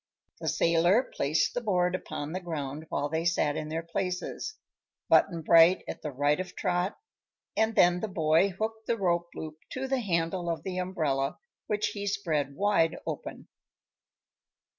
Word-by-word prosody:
The - - -5
sailor 170 +8 +3
placed 145 +3 +1
the 245 - -2
board 180 -5 +1
upon 150 -4 -4
the 185 - -2
ground 155 -3 -5
while 145 - -1
they 160 +2 -1
sat 165 -4 +1
in 155 - -4
their 165 +1 -3
places, 180 - -3 0.5
Button 170 -4 +4
Bright 165 +3 +6
at - - -6
the 150 - -3
right 145 +3 +1
of 185 - -5
Trot, 180 +1 -1 0.6
and 220 0 +2
then 175 0 +5
the 220 - -2
boy 165 0 +3
hooked 220 +3 -4
the 230 - +1
rope 175 -3 0
loop 155 0 -7
to 265 +1 -3
the 265 0 +1
handle 175 -3 -1
of 165 - -2
the 185 -1 -3
umbrella, 155 -7 -1 0.3
which 210 0 0
he 205 -1 -5
spread 155 -8 -1
wide 195 -5 +2
open. - - -6
175 Hz, 160 wpm, -29 LUFS, 160-195 Hz, 0.6 s, Bright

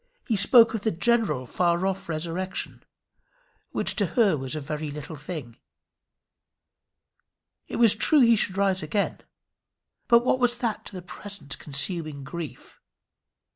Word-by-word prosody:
He 230 - +1
spoke 230 +4 +6
of 220 - -3
the 220 - 0
general 175 - +1
far 175 +6 0
off 195 -2 -3
resurrection, 170 +4 -4 0.9
which - - 0
to 200 -4 +2
her 210 -8 +4
was 135 0 -4
a - - -3
very 150 +1 -5
little 150 +2 -7
thing. 145 -6 -8 2.1
It - - -6
was 230 -3 +6
true 285 +7 +4
he 235 -1 +6
should 195 -2 0
rise 195 -1 +1
again; 195 +7 -2 0.9
but 235 0 +5
what 255 - +2
was 245 -1 +1
that 235 -3 -3
to - - -8
the 185 -2 -8
present 175 -6 -8
consuming 150 0 -2
grief? 160 +2 -9
185 Hz, 140 wpm, -25 LUFS, 150-220 Hz, 2.1 s, spoke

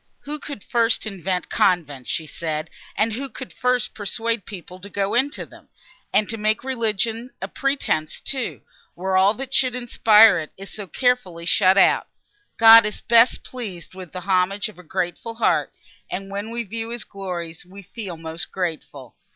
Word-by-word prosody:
"Who 300 +1 -5
could 285 -8 -8
first 230 -1 +1
invent 190 -3 -3
convents!" 145 -8 +1 0.2
said 155 -1 -3
she, - - -24 0.2
"and 220 +1 +2
who 270 +4 -4
could 260 - -9
first 250 -3 0
persuade 225 +1 -2
people 180 -2 -9
to 200 +2 -10
go 200 +1 -1
into 265 +5 +1
them? - - -17 0.4
and 210 - +3
to 225 - -3
make 215 +2 +1
religion 230 -1 -1
a - - -4
pretence, 275 - -1
too, 260 -3 -4 0.3
where 190 +2 -1
all 195 +3 +5
that 270 +2 -6
should 255 -3 +2
inspire 225 -3 +6
it, 155 - -7
is 195 +1 -9
so 205 -2 -6
carefully 195 -9 0
shut 185 +2 +4
out! - - +4 0.5
God 225 0 +10
is 210 - -6
best 235 +1 +5
pleased 205 -11 -7
with 185 -3 -10
the 185 - -6
homage 190 +2 +1
of 205 - -15
a - - -12
grateful 180 +7 -3
heart, 230 - +1 0.4
and, 195 +1 -5
when 200 +2 -4
we 235 +1 -3
view 225 +2 -5
his 235 -2 -5
glories, 175 -5 -6
we 195 +3 -13
feel 190 -2 -7
most 160 +1 -6
grateful. 160 -8 -5
205 Hz, 175 wpm, -23 LUFS, 180-230 Hz, 0.5 s, God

